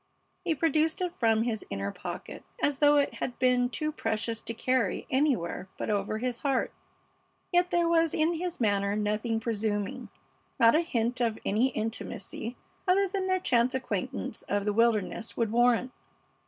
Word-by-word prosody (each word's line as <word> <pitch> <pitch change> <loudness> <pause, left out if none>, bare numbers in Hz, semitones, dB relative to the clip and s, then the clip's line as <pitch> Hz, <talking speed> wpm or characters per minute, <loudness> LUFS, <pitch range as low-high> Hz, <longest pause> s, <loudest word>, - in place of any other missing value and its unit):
He 335 -4 0
produced 315 +1 +2
it 360 -1 0
from 225 -2 +2
his 230 -3 -2
inner 100 0 -3
pocket, 175 - -7 0.2
as 285 -7 0
though 295 0 +6
it 285 - +2
had 245 - -3
been 250 -1 +3
too 305 +4 -2
precious 225 -5 -2
to 230 - -5
carry 255 +1 0
anywhere 260 - +1
but - - -2
over 205 +1 -1
his 245 +1 -2
heart, 275 -2 0 0.8
yet 355 0 +3
there 345 -1 +2
was 330 -1 +3
in 315 +2 +2
his 350 +1 -4
manner 200 -3 +1
nothing 215 +2 0
presuming, 210 -3 -2 0.5
not 230 0 +7
a 315 - +4
hint 245 -6 -1
of 225 -2 +1
any 220 +6 +3
intimacy 225 0 -4 0.3
other 390 +2 +4
than 380 0 -2
their 370 0 +2
chance 250 -5 +2
acquaintance 250 -1 -3
of 200 0 0
the 210 - +1
wilderness 225 0 +1
would 230 -3 +1
warrant. 240 +2 +3
240 Hz, 165 wpm, -29 LUFS, 220-300 Hz, 0.8 s, not